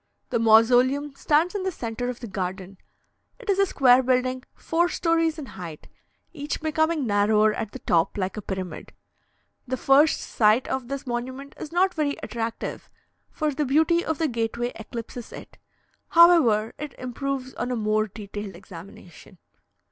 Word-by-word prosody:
The 235 - +1
mausoleum 245 +6 +4
stands 305 +5 +1
in 405 - -2
the 380 0 -1
centre 245 -4 -4
of 250 - -6
the 235 - -6
garden; 190 -1 -5 0.6
it 470 -4 -2
is 390 - 0
a 395 - +4
square 255 -6 +5
building 255 0 0
four 340 +2 0
stories 330 -2 +1
in 300 - -6
height, 170 -9 -9 0.5
each 295 -2 -4
becoming 315 -1 0
narrower 210 0 +3
at 210 - -4
the - - -7
top, 165 +3 +1
like 190 -1 -2
a 215 - -5
pyramid. 190 -4 -6 0.7
The 260 +1 -2
first 280 +5 +4
sight 215 +3 +2
of 265 -2 -3
this 275 +1 -5
monument 255 +3 -5
is 300 - -7
not 365 +2 +2
very 295 -3 -1
attractive, 230 -1 -5 0.4
for 305 -2 -2
the 295 - -1
beauty 320 +5 +2
of 320 - -2
the 320 - +1
gateway 235 0 -2
eclipses 230 +1 -8
it; - - -11 0.5
however, 305 -11 +5
it 300 -1 -6
improves 260 +1 -4
on 245 - -4
a 250 - -1
more 215 -1 +1
detailed 205 -1 -8
examination. 180 0 -13
250 Hz, 160 wpm, -25 LUFS, 215-300 Hz, 0.7 s, square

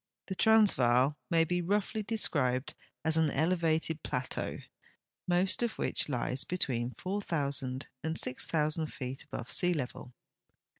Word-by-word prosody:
The 190 - -4
Transvaal 150 - +4
may 165 -1 +4
be 180 +2 -1
roughly 205 +4 -1
described 145 - 0 0.3
as 160 0 +4
an 160 -1 +3
elevated 160 0 0
plateau, 125 +1 -3 0.7
most 180 +4 +2
of 235 -2 -1
which - - +2
lies 125 0 +2
between 125 -9 -2
4,000 145 -9 -2 0.2
and 160 +1 -1
6,000 155 +4 0
feet 135 -1 -7
al)ove 115 -1 -6
sea 180 +6 +2
level. 125 -3 -5
155 Hz, 120 wpm, -31 LUFS, 130-180 Hz, 0.7 s, Transvaal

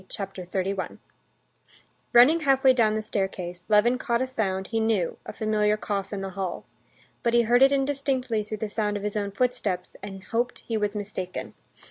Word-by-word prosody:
Chapter 195 -2 -6
31 190 +1 -2 1.1
Running 255 +8 +7
halfway 270 -3 +4
down 225 -4 +3
the 215 0 -1
staircase, 185 -4 -3
Levin 230 +4 +4
caught 235 -2 0
a - - 0
sound 195 -7 -2
he 225 - 0
knew, 220 -6 +1
a - - -4
familiar 215 -1 +1
cough 200 -2 -3
in 200 -2 -3
the 195 0 -4
hall. 190 -1 -4 0.6
But 235 0 +1
he 235 - +5
heard 240 +2 +3
it 270 +1 +7
indistinctly 270 -4 0
through 215 +1 -5
the 220 - -3
sound 210 -1 -1
of 200 - -7
his 210 0 -2
own 205 -1 -1
footsteps, 200 -5 -1
and 195 -1 -8
hoped 240 +4 -1
he 230 - -2
was 210 -1 -1
mistaken. 195 -3 -5
215 Hz, 180 wpm, -26 LUFS, 195-240 Hz, 1.1 s, Running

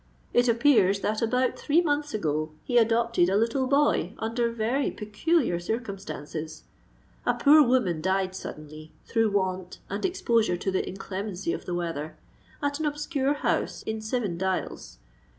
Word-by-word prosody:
It 245 +1 +4
appears 225 -5 +4
that 215 +1 -1
about 250 +2 +1
three 305 +3 +3
months 295 -3 0
ago 155 -5 -1
he 245 -1 +3
adopted 230 -5 +2
a 195 - +2
little 235 +4 +1
boy 280 - +2
under 230 +2 -1
very 235 +5 0
peculiar 215 - 0
circumstances. 175 - -5 0.6
A - - +1
poor 300 +2 +7
woman 240 - +2
died 190 +1 0
suddenly, 155 -3 -9
through 225 -1 +2
want 185 -2 -2
and 200 - -3
exposure 230 - +1
to 190 - -2
the 190 - -1
inclemency 195 -1 -4
of - - -6
the 175 - -3
weather, 165 -3 -4 0.5
at 285 +1 -1
an 310 - 0
obscure 290 -1 -1
house 290 - -1
in 220 0 -4
Seven 215 -6 -2
Dials. 190 - -3
220 Hz, 150 wpm, -27 LUFS, 185-255 Hz, 0.6 s, poor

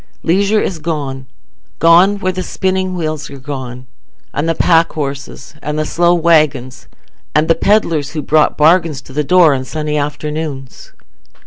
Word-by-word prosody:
Leisure 200 +5 +2
is 180 -5 -3
gone—gone 160 +5 0
where 185 -2 -1
the 185 0 -4
spinning 185 0 -2
wheels 155 -2 -4
are 140 - -10
gone, 130 -2 -7 0.5
and 155 +3 -1
the 165 - 0
pack 165 0 +3
horses, 140 -1 -6
and 150 0 -4
the 155 - -1
slow 175 +2 +2
waggons, 155 -7 +1 0.5
and 155 +1 +3
the 165 - +5
pedlars, 165 -8 0
who 155 - -3
brought 155 0 +2
bargains 160 -1 +3
to 135 -1 -14
the 150 +2 0
door 175 -1 +5
on 130 -1 -2
sunny 150 +2 -3
afternoons. 150 -2 -5
155 Hz, 150 wpm, -15 LUFS, 145-170 Hz, 0.5 s, the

